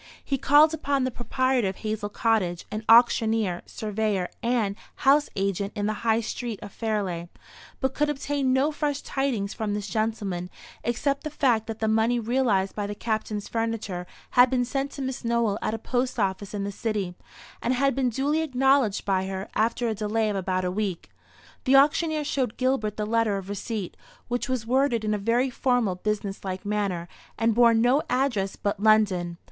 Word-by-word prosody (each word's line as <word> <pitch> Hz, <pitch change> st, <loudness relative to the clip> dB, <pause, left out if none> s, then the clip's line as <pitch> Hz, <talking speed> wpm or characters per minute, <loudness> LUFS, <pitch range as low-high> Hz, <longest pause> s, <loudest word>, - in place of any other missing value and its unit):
He 275 Hz, -2 st, -1 dB
called 300 Hz, +4 st, +6 dB
upon 285 Hz, -4 st, 0 dB
the 255 Hz, -, 0 dB
proprietor 255 Hz, -1 st, 0 dB
of 190 Hz, -, -3 dB
Hazel 215 Hz, -1 st, -3 dB
Cottage, 205 Hz, -6 st, 0 dB
an 215 Hz, +1 st, -4 dB
auctioneer, 225 Hz, -5 st, +4 dB
surveyor, 210 Hz, -3 st, -2 dB
and 230 Hz, -4 st, 0 dB, 0.2 s
house 285 Hz, +2 st, +3 dB
agent 195 Hz, 0 st, -1 dB
in 205 Hz, -1 st, -1 dB
the 215 Hz, -, 0 dB
High 225 Hz, 0 st, +2 dB
street 230 Hz, -1 st, -4 dB
of 205 Hz, -, -8 dB
Fairleigh, 195 Hz, -7 st, -2 dB, 0.5 s
but 265 Hz, -1 st, 0 dB
could 295 Hz, +2 st, +1 dB
obtain 280 Hz, -2 st, -1 dB
no 265 Hz, +4 st, +3 dB
fresh 290 Hz, -1 st, -2 dB
tidings 245 Hz, -8 st, -1 dB
from 210 Hz, -2 st, -2 dB
this 205 Hz, -1 st, -3 dB
gentleman, 205 Hz, -6 st, -2 dB, 0.3 s
except 275 Hz, +4 st, -1 dB
the 305 Hz, -, -3 dB
fact 245 Hz, -7 st, +1 dB
that 225 Hz, -1 st, -4 dB
the 220 Hz, -, -1 dB
money 225 Hz, +2 st, +2 dB
realised 225 Hz, -5 st, +1 dB
by 205 Hz, -1 st, -3 dB
the 205 Hz, -, -5 dB
Captain's 215 Hz, -2 st, -3 dB
furniture 225 Hz, -6 st, -3 dB, 0.2 s
had 250 Hz, 0 st, +6 dB
been 250 Hz, -1 st, +1 dB
sent 270 Hz, +2 st, -2 dB
to 275 Hz, -, -5 dB
Miss 260 Hz, 0 st, -4 dB
Nowell 230 Hz, -3 st, +1 dB
at 215 Hz, -, -1 dB
a -, -, -3 dB
post 250 Hz, +3 st, -2 dB
office 195 Hz, 0 st, -1 dB
in 200 Hz, -, -2 dB
the 200 Hz, -, -3 dB
City, 200 Hz, -3 st, -2 dB, 0.5 s
and 250 Hz, +2 st, +1 dB
had 275 Hz, +2 st, +2 dB
been 265 Hz, -2 st, +1 dB
duly 280 Hz, +6 st, 0 dB
acknowledged 270 Hz, -6 st, +2 dB
by 190 Hz, -1 st, +1 dB
her, 190 Hz, +1 st, -5 dB
after 230 Hz, +2 st, +1 dB
a 225 Hz, -, 0 dB
delay 215 Hz, +1 st, 0 dB
of -, -, -3 dB
about 185 Hz, -1 st, -1 dB
a 180 Hz, -, 0 dB
week. 190 Hz, -3 st, -3 dB, 0.5 s
The 265 Hz, 0 st, +4 dB
auctioneer 305 Hz, +2 st, +4 dB
showed 265 Hz, -5 st, -1 dB
Gilbert 255 Hz, -5 st, 0 dB
the 210 Hz, -, -1 dB
letter 225 Hz, -2 st, +1 dB
of 195 Hz, 0 st, -7 dB
receipt, 205 Hz, -1 st, -4 dB, 0.3 s
which 245 Hz, +2 st, -2 dB
was 255 Hz, -4 st, -1 dB
worded 245 Hz, -2 st, +1 dB
in 215 Hz, -, +1 dB
a 210 Hz, -, -1 dB
very 240 Hz, +5 st, +1 dB
formal 245 Hz, -6 st, +1 dB
business 200 Hz, +1 st, -3 dB
like 190 Hz, 0 st, -5 dB
manner, 200 Hz, -5 st, -1 dB, 0.3 s
and 225 Hz, 0 st, +2 dB
bore 235 Hz, 0 st, +5 dB
no 245 Hz, +6 st, +4 dB
address 245 Hz, -7 st, 0 dB
but 205 Hz, 0 st, -2 dB
"London." 200 Hz, -5 st, +3 dB
225 Hz, 185 wpm, -26 LUFS, 205-255 Hz, 0.5 s, called